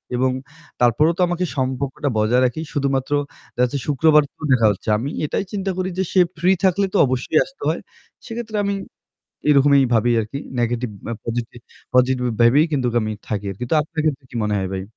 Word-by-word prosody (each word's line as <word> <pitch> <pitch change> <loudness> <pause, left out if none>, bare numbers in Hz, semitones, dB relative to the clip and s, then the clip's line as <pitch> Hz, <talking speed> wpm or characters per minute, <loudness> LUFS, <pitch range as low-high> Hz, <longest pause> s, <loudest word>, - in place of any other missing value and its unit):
এবং 130 +1 +2 0.5
তারপরও 150 +8 +4
তো - - 0
আমাকে 175 +1 -1
সম্পর্কটা 135 +2 -1
বজায় 115 +4 +3
রাখি। 125 +6 -1
শুধুমাত্র 140 -1 -1 0.4
দেখা 125 - +2
যাচ্ছে 140 +3 -3
শুক্রবার 150 +1 +4
তো - - -28
দেখা 115 -4 +5
হচ্ছে 100 - -5
আমি 130 +6 -3 0.2
এটাই 170 - -1
চিন্তা 195 -2 -2
করি 185 0 -1
যে 190 - +1
সে 185 - +4 0.2
free 185 +2 +4
থাকলে 195 +2 +3
তো - - +2
অবশ্যই 130 +4 0
আসতে 270 - -19
হয়। 165 - -1 0.5
সেক্ষেত্রে 230 -2 -6
আমি 200 0 0 0.8
এরকমই 140 -1 +5
ভাবি 115 +2 +3
আরকি 110 +6 -5 0.2
negative 120 -1 -1 0.3
positive 120 0 -4 0.3
positive 125 0 +3
ভাবেই 135 +7 +5
কিন্তু 125 -5 0
আমি 110 -1 -2 0.2
থাকি 105 -2 -2
আরকি। 100 +6 -5
তো - - +3
আপনার 155 +1 -5
ক্ষেত্রে 140 -3 -1
কি 120 - -7
মনে 105 0 0
হয় 95 -1 -2
ভাই? 95 - -3
135 Hz, 185 wpm, -21 LUFS, 120-160 Hz, 0.8 s, দেখা